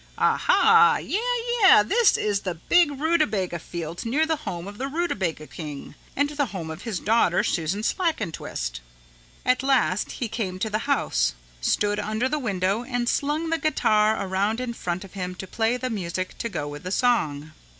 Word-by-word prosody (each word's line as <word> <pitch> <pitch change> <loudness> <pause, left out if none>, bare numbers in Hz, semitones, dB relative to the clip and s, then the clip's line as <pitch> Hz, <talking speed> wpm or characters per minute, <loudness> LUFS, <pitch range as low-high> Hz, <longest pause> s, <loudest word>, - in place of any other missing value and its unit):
"Ah - - +3
hah, 450 +1 +5
yeah, 405 - -2 0.4
yeah, 380 - +8
this 440 - +3
is 205 -2 0
the 185 -3 -4
big 340 - +3
rutabaga 285 - +1
field 170 0 -6
near 275 +8 +1
the 320 -1 0
home 175 +1 -6
of 205 +1 -9
the 270 - -2
rutabaga 210 - -2
king 150 -3 -8 0.2
and 285 +1 +2
the 290 -2 -1
home 175 -6 -6
of 160 +3 -8
his 215 -6 -3
daughter, 210 -4 +2
Susan 190 +1 -1
Slackentwist." 165 - -2 0.7
At 255 0 +3
last 265 -7 +1
he 240 - -3
came 195 -5 -3
to 215 +3 -3
the 215 +5 -2
house, - - +1 0.3
stood 205 - +1
under 215 +4 -1
the 300 +3 -1
window 200 -2 -1
and 245 -1 -2
slung 300 +5 0
the 330 - +1
guitar 220 -8 +2
around 200 +4 0
in 250 -2 -3
front 180 -4 -4
of 195 - -13
him 180 -2 -4
to 190 - -7
play 225 +5 0
the 255 0 -3
music 185 -3 -3
to 230 - -2
go 145 - -4
with 145 0 -7
the 180 - -5
song. 155 - +1
215 Hz, 180 wpm, -25 LUFS, 180-270 Hz, 0.7 s, yeah